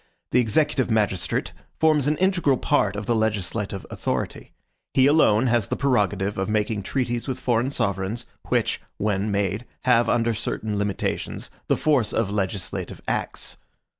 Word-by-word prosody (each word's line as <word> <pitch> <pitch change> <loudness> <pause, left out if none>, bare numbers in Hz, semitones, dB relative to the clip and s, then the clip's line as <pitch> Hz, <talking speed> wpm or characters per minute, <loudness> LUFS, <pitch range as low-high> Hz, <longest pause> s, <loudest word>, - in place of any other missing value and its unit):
The 125 - +4
executive 130 +3 +2
magistrate 105 -5 0 0.3
forms 155 -3 +4
an 150 0 +2
integral 180 -8 +2
part 105 -10 +1
of 105 0 -4
the 120 - +1
legislative 105 -2 -1
authority. - - -3 0.4
He 130 - +6
alone 130 -6 +5
has 120 -4 +2
the - - -1
prerogative 105 -7 +1
of 95 - -1
making 105 0 0
treaties 120 +3 -2
with 130 - -3
foreign 120 +1 +1
sovereigns, 105 -2 -1 0.2
which, - - 0 0.2
when 105 0 0
made, 100 +2 0 0.2
have, 120 -2 +3
under 115 -1 +2
certain 105 -1 -2
limitations, 100 -1 -2 0.2
the - - +2
force 135 -9 +2
of 110 -3 0
legislative 100 -2 -3
acts. - - -2
110 Hz, 145 wpm, -24 LUFS, 100-130 Hz, 0.4 s, He